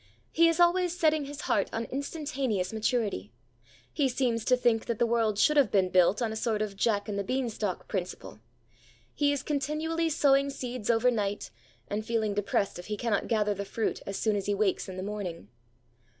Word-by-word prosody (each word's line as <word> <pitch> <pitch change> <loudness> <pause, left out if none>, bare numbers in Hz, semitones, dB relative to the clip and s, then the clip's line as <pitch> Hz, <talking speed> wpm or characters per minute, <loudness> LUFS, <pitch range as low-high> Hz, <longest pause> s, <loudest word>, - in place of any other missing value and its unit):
He 335 0 +5
is 330 +1 +1
always 350 0 +3
setting 310 -3 +2
his 290 +2 -7
heart 200 - +1
on 225 - -2
instantaneous 270 - -2
maturity. 215 - -1 0.6
He 280 -3 +2
seems 240 -3 0
to 255 - +4
think 235 -2 +1
that 235 -2 -1
the 240 - +3
world 225 -3 +1
should 300 +7 +4
have 280 - +5
been 190 -2 +2
built 185 +5 +4
on 225 - -1
a - - -4
sort 220 -1 0
of 205 -2 -5
Jack 205 0 +1
and 200 -1 -2
the - - -1
beanstalk 225 -4 -2
principle. 180 - -5 0.7
He 290 -1 +2
is 285 - -2
continually 310 +3 -1
sowing 280 -2 +3
seeds 250 -5 -5
overnight, 225 - +1 0.4
and 210 +1 -3
feeling 220 -2 0
depressed 200 -2 -1
if 175 - -9
he 210 -1 -3
cannot 215 -2 0
gather 210 -3 +1
the 200 0 -4
fruit 220 +2 -2
as 195 - -3
soon 215 -2 +1
as 200 -1 -3
he 205 - +1
wakes 200 -2 0
in 185 - -7
the 185 - -4
morning. 190 - -5
225 Hz, 195 wpm, -29 LUFS, 205-275 Hz, 0.7 s, He